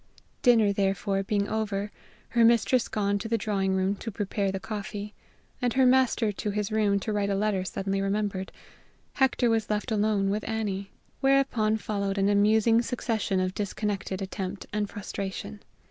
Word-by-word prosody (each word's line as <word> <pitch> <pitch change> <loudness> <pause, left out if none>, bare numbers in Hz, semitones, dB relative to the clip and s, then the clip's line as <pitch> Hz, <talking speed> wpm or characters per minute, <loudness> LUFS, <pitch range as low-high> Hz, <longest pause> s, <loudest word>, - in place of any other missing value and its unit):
Dinner, 225 -5 +5
therefore, 195 0 0
being 200 +1 0
over, 210 -2 -2 0.4
her 235 - +3
mistress 235 +2 +4
gone 200 -1 0
to 225 - -5
the 230 +1 +1
drawing 195 -2 0
room 190 +1 +1
to 225 - -5
prepare 200 -1 -2
the 195 - -3
coffee, 210 0 -6 0.5
and 245 -2 +1
her 265 0 +4
master 250 -4 +3
to 205 +1 -4
his 205 +1 -2
room 210 -2 +2
to 215 - -2
write 205 -1 0
a 200 - +1
letter 200 -2 0
suddenly 195 +1 -2
remembered, 195 -1 -1 0.6
Hector 260 -3 +2
was 225 -1 0
left 210 +3 -1
alone 205 -2 +1
with 210 +1 -1
Annie. 200 -3 -2 0.3
Whereupon 270 -6 +2
followed 200 -2 -2
an 195 0 +2
amusing 220 +3 +4
succession 225 -5 -1
of 185 0 0
disconnected 200 -1 -3
attempt 190 0 -5
and 210 -1 -1
frustration. 200 0 -6
205 Hz, 160 wpm, -27 LUFS, 195-220 Hz, 0.6 s, Dinner